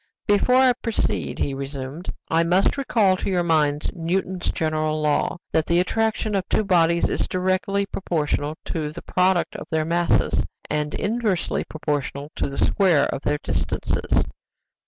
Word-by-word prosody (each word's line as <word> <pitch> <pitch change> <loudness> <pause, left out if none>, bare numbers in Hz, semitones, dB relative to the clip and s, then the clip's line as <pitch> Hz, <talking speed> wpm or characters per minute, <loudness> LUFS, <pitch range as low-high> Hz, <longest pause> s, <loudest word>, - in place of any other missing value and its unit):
"Before 205 +5 +3
I 260 -1 +6
proceed," 230 -2 -2
he 140 - -1
resumed, 140 +4 -5 0.2
"I 165 +1 +2
must 180 +3 +2
recall 220 -9 +2
to - - -3
your 180 -2 +1
minds 150 -3 +1
Newton's 180 +1 -2
general 155 -1 -1
law, 150 +3 +1
'that 160 -1 +1
the 170 +1 +3
attraction 220 +3 0
of 195 -2 -1
two - - +2
bodies 170 -3 +3
is - - -1
directly 185 +2 0
proportional 155 -6 -2
to 155 -2 -2
the 170 - -9
product 185 -1 +1
of - - -9
their 160 -1 0
masses, 170 +1 +2 0.3
and 150 0 -1
inversely 210 -4 0
proportional 145 -1 -3
to - - -1
the 140 - -7
square 175 -8 +3
of 135 - -4
their 150 0 0
distances. - - 0
170 Hz, 155 wpm, -23 LUFS, 150-195 Hz, 0.3 s, I